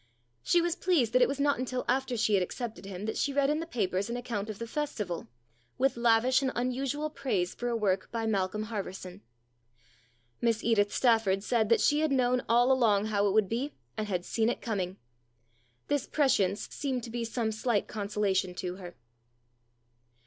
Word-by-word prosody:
She 345 Hz, -, +3 dB
was 345 Hz, 0 st, 0 dB
pleased 335 Hz, -, +1 dB
that 255 Hz, -, +4 dB
it -, -, +6 dB
was 275 Hz, +1 st, -3 dB
not 285 Hz, -2 st, +2 dB
until 255 Hz, 0 st, -3 dB
after 255 Hz, -1 st, 0 dB
she 215 Hz, -1 st, +1 dB
had 195 Hz, -, +4 dB
accepted 220 Hz, +3 st, -5 dB
him 195 Hz, 0 st, -6 dB
that 220 Hz, -, -3 dB
she 285 Hz, -, 0 dB
read 280 Hz, 0 st, +2 dB
in 305 Hz, -, 0 dB
the 330 Hz, -, -5 dB
papers 200 Hz, -, -1 dB
an 240 Hz, -, -2 dB
account 225 Hz, -4 st, -4 dB
of 215 Hz, -, -5 dB
the 230 Hz, -, -5 dB
Festival, 225 Hz, -, -3 dB, 0.5 s
with 270 Hz, +1 st, +2 dB
lavish 235 Hz, +3 st, +3 dB
and 265 Hz, -1 st, 0 dB
unusual 270 Hz, +5 st, -1 dB
praise 190 Hz, -12 st, -1 dB
for 245 Hz, -, -4 dB
a 240 Hz, -, 0 dB
work 195 Hz, -4 st, 0 dB
by 230 Hz, -1 st, -2 dB
Malcolm 205 Hz, -1 st, 0 dB
Harverson. 195 Hz, -4 st, -6 dB, 1.2 s
Miss 230 Hz, -2 st, +1 dB
Edith 205 Hz, -3 st, +2 dB
Stafford 225 Hz, -6 st, +2 dB
said 220 Hz, -2 st, +1 dB
that 230 Hz, -, +4 dB
she 295 Hz, 0 st, +3 dB
had 310 Hz, -1 st, +1 dB
known 250 Hz, -2 st, +2 dB
all 240 Hz, +3 st, +5 dB
along 220 Hz, -6 st, +3 dB
how 205 Hz, 0 st, +3 dB
it -, -, +2 dB
would 215 Hz, -2 st, +3 dB
be, 245 Hz, +8 st, -2 dB, 0.2 s
and 215 Hz, -, -3 dB
had 180 Hz, -3 st, -2 dB
seen 225 Hz, 0 st, +1 dB
it -, -, -2 dB
coming. 195 Hz, -4 st, -3 dB, 0.9 s
This 290 Hz, -2 st, 0 dB
prescience 210 Hz, -9 st, +1 dB
seemed 260 Hz, -4 st, -2 dB
to 230 Hz, -, -7 dB
be 235 Hz, 0 st, -3 dB
some 230 Hz, -1 st, -1 dB
slight 220 Hz, 0 st, 0 dB
consola 205 Hz, -1 st, -1 dB
tion 185 Hz, -1 st, 0 dB
to 180 Hz, 0 st, -4 dB
her. 175 Hz, -2 st, -9 dB
230 Hz, 190 wpm, -29 LUFS, 200-255 Hz, 1.2 s, it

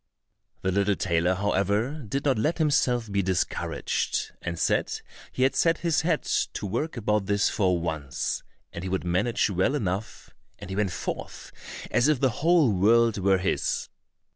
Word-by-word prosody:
The 95 Hz, -, +1 dB
little 100 Hz, +1 st, +2 dB
tailor, 90 Hz, 0 st, +1 dB
however, 105 Hz, +9 st, 0 dB
did 140 Hz, +5 st, -2 dB
not 135 Hz, -6 st, +2 dB
let 155 Hz, +10 st, +1 dB
himself 125 Hz, -8 st, +1 dB
be 100 Hz, 0 st, +1 dB
discouraged, 95 Hz, -1 st, -1 dB
and 85 Hz, -1 st, -4 dB
said -, -, 0 dB, 0.3 s
he 130 Hz, -, 0 dB
had 135 Hz, -, +2 dB
set 165 Hz, 0 st, +3 dB
his 165 Hz, -2 st, +2 dB
head 160 Hz, -1 st, 0 dB
to -, -, -1 dB
work 120 Hz, -, -2 dB
about 105 Hz, -3 st, 0 dB
this 100 Hz, 0 st, +2 dB
for 90 Hz, -4 st, +1 dB
once, 80 Hz, -6 st, -3 dB, 0.3 s
and 85 Hz, -, -6 dB
he 95 Hz, -, -3 dB
would 95 Hz, -1 st, -1 dB
manage 95 Hz, +6 st, +1 dB
well 95 Hz, +10 st, +1 dB
enough, 100 Hz, -4 st, -4 dB, 0.3 s
and 95 Hz, -, -9 dB
he -, -, -3 dB
went 100 Hz, -2 st, 0 dB
forth 85 Hz, -, -6 dB, 0.4 s
as 125 Hz, +2 st, +3 dB
if 150 Hz, -4 st, +2 dB
the 130 Hz, -2 st, +2 dB
whole 165 Hz, -6 st, +4 dB
world 115 Hz, +3 st, +3 dB
were 95 Hz, 0 st, +3 dB
his. 95 Hz, +1 st, -1 dB
105 Hz, 165 wpm, -26 LUFS, 95-130 Hz, 0.4 s, whole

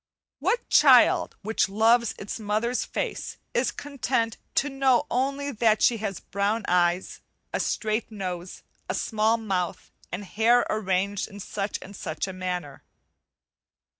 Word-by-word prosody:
What 480 Hz, 0 st, 0 dB
child -, -, +6 dB
which 220 Hz, -1 st, +1 dB
loves 225 Hz, +3 st, +3 dB
its 200 Hz, +3 st, -6 dB
mother's 220 Hz, +4 st, -1 dB
face -, -, -4 dB, 0.2 s
is -, -, +2 dB
content 255 Hz, -5 st, -2 dB, 0.2 s
to 290 Hz, -, +2 dB
know 270 Hz, -1 st, +2 dB
only 275 Hz, +3 st, 0 dB
that 220 Hz, -3 st, +2 dB
she 235 Hz, -, +4 dB
has 200 Hz, -4 st, -4 dB
brown 205 Hz, +2 st, -1 dB
eyes, 175 Hz, 0 st, +1 dB, 0.3 s
a -, -, 0 dB
straight 215 Hz, +1 st, -1 dB
nose, 185 Hz, -3 st, -6 dB, 0.3 s
a -, -, 0 dB
small 220 Hz, +1 st, +1 dB
mouth, 190 Hz, -6 st, -3 dB, 0.2 s
and 195 Hz, +4 st, -4 dB
hair 230 Hz, +5 st, +3 dB
arranged 200 Hz, -1 st, 0 dB
in 205 Hz, -1 st, -11 dB
such 200 Hz, +1 st, -3 dB
and 200 Hz, +2 st, -11 dB
such 160 Hz, -1 st, -4 dB
a 190 Hz, -, -5 dB
manner? 180 Hz, -6 st, -5 dB
215 Hz, 135 wpm, -26 LUFS, 190-235 Hz, 0.3 s, child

